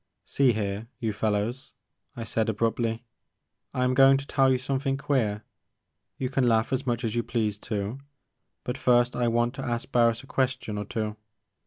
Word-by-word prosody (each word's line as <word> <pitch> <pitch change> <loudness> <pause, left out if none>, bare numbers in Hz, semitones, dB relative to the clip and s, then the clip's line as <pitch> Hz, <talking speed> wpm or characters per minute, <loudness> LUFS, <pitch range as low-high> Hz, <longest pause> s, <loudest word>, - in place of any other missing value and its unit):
"See 135 -3 +3
here, 105 +1 -3
you 115 -4 -2
fellows," 105 +4 -2 0.4
I 115 - -5
said 115 0 0
abruptly, 115 +1 0 0.7
"I 125 - -1
am 125 0 +2
going 135 +1 +7
to 140 - -6
tell 135 -1 +3
you 130 - +3
something 135 +1 -1
queer. 125 -7 0 0.7
You 130 - -1
can 130 -1 +1
laugh 115 +2 +2
as 130 0 -1
much 120 0 0
as 110 -2 -1
you 120 - +1
please 110 -4 -1
too, 105 +5 -3 0.6
but 125 +2 -4
first 120 0 +3
I 120 -1 +1
want 120 +1 +1
to 135 -1 -6
ask 120 +1 -3
Barris 115 -1 +3
a - - -12
question 130 -6 -1
or 105 - -4
two. 110 0 -3
120 Hz, 180 wpm, -27 LUFS, 110-130 Hz, 0.7 s, going